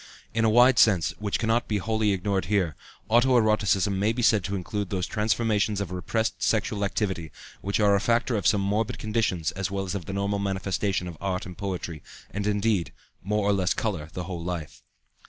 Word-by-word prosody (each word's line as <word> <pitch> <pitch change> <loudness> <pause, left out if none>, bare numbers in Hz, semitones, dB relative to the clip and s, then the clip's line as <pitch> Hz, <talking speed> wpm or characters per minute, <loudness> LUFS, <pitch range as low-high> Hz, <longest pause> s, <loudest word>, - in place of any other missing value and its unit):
In 115 +1 +1
a - - +4
wide 120 +3 +6
sense, 95 -7 +4
which 105 -1 -1
cannot 115 +1 +1
be 105 - 0
wholly 110 +1 0
ignored 95 -1 0
here, 90 -5 0 0.3
auto 120 +3 +4
erotism 100 -3 +2
may 105 +3 +2
be 120 +1 -2
said 110 -3 +4
to 100 - -2
include 100 +1 -3
those 95 -2 -1
transformations 105 -1 0
of 100 -3 -4
repressed 110 +5 -2
sexual 105 -2 0
activity 95 -6 -2 0.3
which 100 +3 -1
are 105 -1 +4
a 100 - +4
factor 120 +2 +1
of 100 - +1
some 105 - +3
morbid 105 +3 0
conditions 105 -7 -1
as 95 0 -3
well 95 0 -2
as 90 - -4
of 95 -5 -4
the 95 - -4
normal 100 +1 -1
manifestation 95 -1 -1
of 85 -4 -8
art 95 -2 -2
and 90 -1 -10
poetry, 90 -5 -4 0.3
and, 105 0 -3
indeed, 105 -3 +1 0.3
more 105 +1 0
or 105 - +4
less 95 -2 +1
color 85 -9 -2
the 90 - -4
whole 85 0 -5
of 85 - -6
life. 85 -4 -5
100 Hz, 205 wpm, -26 LUFS, 95-110 Hz, 0.3 s, wide